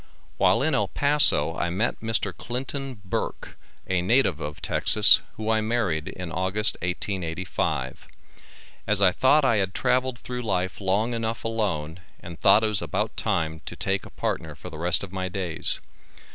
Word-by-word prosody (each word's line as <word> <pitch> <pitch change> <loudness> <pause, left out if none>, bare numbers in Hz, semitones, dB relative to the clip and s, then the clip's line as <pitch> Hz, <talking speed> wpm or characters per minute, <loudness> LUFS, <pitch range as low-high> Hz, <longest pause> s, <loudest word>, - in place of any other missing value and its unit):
While - - +3
in - - +1
El - - +2
Paso, 140 - +3
I 85 - -1
met 100 +8 -1
Mr. 110 -4 -1
Clinton 130 0 -5
Burk, 90 - -4 0.3
a 90 -1 0
native 110 - +2
of 75 0 -6
Texas, 105 -1 +4 0.2
who 110 - -5
I 110 -1 +2
married 110 -9 -1
in 90 -3 -6
August 95 +5 +1
1885. 90 -7 -3 0.8
As 105 -2 +2
I 95 -2 +5
thought 135 +8 +3
I 115 -4 +3
had 95 -1 -1
travelled 130 -1 +1
through 125 0 -6
life 95 -3 -2
long 100 +5 0
enough 115 0 -3
alone 95 -8 -2 0.2
and 85 -2 -10
thought 105 +3 +5
it - - +3
was 105 - 0
about 85 -4 -2
time 80 0 -1
to - - -6
take 95 0 -1
a - - -11
partner - - -4
for - - -10
the 75 - -9
rest 90 +3 +3
of 95 - -7
my 95 -1 -3
days. 90 -3 +2
100 Hz, 170 wpm, -25 LUFS, 90-115 Hz, 0.8 s, I